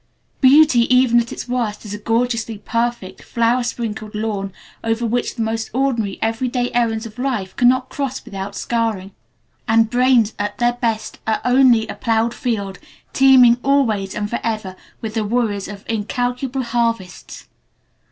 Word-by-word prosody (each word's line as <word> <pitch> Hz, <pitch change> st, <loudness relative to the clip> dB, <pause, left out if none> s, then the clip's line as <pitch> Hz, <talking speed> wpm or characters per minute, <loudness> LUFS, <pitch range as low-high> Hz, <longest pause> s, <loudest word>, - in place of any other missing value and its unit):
Beauty 265 Hz, -3 st, +5 dB
even 250 Hz, -2 st, +5 dB
at 235 Hz, 0 st, -3 dB
its -, -, -6 dB
worst 235 Hz, -4 st, -2 dB
is 205 Hz, -, -6 dB
a 210 Hz, -, -5 dB
gorgeously 230 Hz, 0 st, -1 dB
perfect, 230 Hz, -2 st, -3 dB
flower 235 Hz, +2 st, +1 dB
sprinkled 220 Hz, -3 st, -4 dB
lawn 210 Hz, -2 st, -3 dB, 0.3 s
over 225 Hz, +1 st, -1 dB
which 240 Hz, +2 st, -1 dB
the 230 Hz, -, -1 dB
most 225 Hz, 0 st, -2 dB
ordinary, 245 Hz, -7 st, 0 dB
every 225 Hz, +3 st, -1 dB
day 245 Hz, 0 st, -1 dB
errands 230 Hz, -2 st, 0 dB
of 225 Hz, +1 st, -10 dB
life 245 Hz, -8 st, -2 dB
cannot 255 Hz, +1 st, +3 dB
cross 270 Hz, -3 st, -4 dB
without 200 Hz, -3 st, -6 dB
scarring. 225 Hz, -5 st, -2 dB, 0.6 s
And 225 Hz, 0 st, +3 dB
brains 245 Hz, -3 st, +3 dB
at 205 Hz, 0 st, -3 dB
their 240 Hz, 0 st, +2 dB
best 230 Hz, -2 st, -3 dB
are 220 Hz, -, +1 dB
only 250 Hz, -3 st, +4 dB
a -, -, -5 dB
ploughed 230 Hz, 0 st, 0 dB
field 205 Hz, -8 st, -3 dB, 0.3 s
teeming 255 Hz, -3 st, +6 dB
always 230 Hz, -9 st, +1 dB
and 205 Hz, -, -2 dB
forever 215 Hz, -4 st, -3 dB, 0.3 s
with 220 Hz, -1 st, -5 dB
the 220 Hz, -1 st, -1 dB
worries 210 Hz, -3 st, -1 dB
of 200 Hz, 0 st, -10 dB
incalculable 245 Hz, +4 st, -2 dB
harvests. 230 Hz, -6 st, -3 dB
230 Hz, 150 wpm, -19 LUFS, 215-245 Hz, 0.6 s, teeming